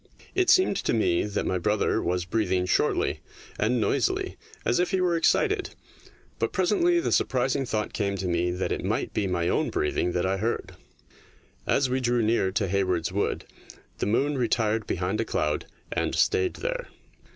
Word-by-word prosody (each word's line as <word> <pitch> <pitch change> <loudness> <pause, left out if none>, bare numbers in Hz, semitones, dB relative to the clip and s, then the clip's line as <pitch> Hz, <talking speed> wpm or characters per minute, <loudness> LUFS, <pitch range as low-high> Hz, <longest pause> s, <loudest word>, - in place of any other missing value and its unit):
It 375 -1 +2
seemed 370 - +5
to - - 0
me 95 -6 +2
that 105 - -2
my 95 - 0
brother 105 +3 +1
was 90 0 -1
breathing 95 -2 0
shortly 90 - +1 0.4
and 120 +4 +2
noisily 110 - 0 0.3
as 120 - +2
if 180 - +2
he 190 - +1
were 180 -2 +2
excited, 400 - +1 0.6
but - - 0
presently 350 -3 +2
the - - -1
surprising 130 +1 +1
thought 105 -2 -2
came 100 -2 -1
to 95 -1 -3
me 85 0 +1
that 90 +1 -2
it - - -2
might - - -1
be 100 - 0
my 85 -2 0
own - - +1
breathing 85 +4 0
that 90 - 0
I 95 +1 0
heard. 115 +4 -2 1.0
As 135 - +3
we 130 +1 0
drew 120 -2 +1
near 110 -4 +2
to 100 0 0
Hayward's 90 -3 0
Wood 100 +2 -1 0.5
the - - 0
moon 135 +6 +1
retired 110 -2 +1
behind 95 +5 -1
a - - +1
cloud, - - -1 0.2
and - - -1
stayed 410 -3 +2
there. - - -3
110 Hz, 175 wpm, -26 LUFS, 95-135 Hz, 1.0 s, seemed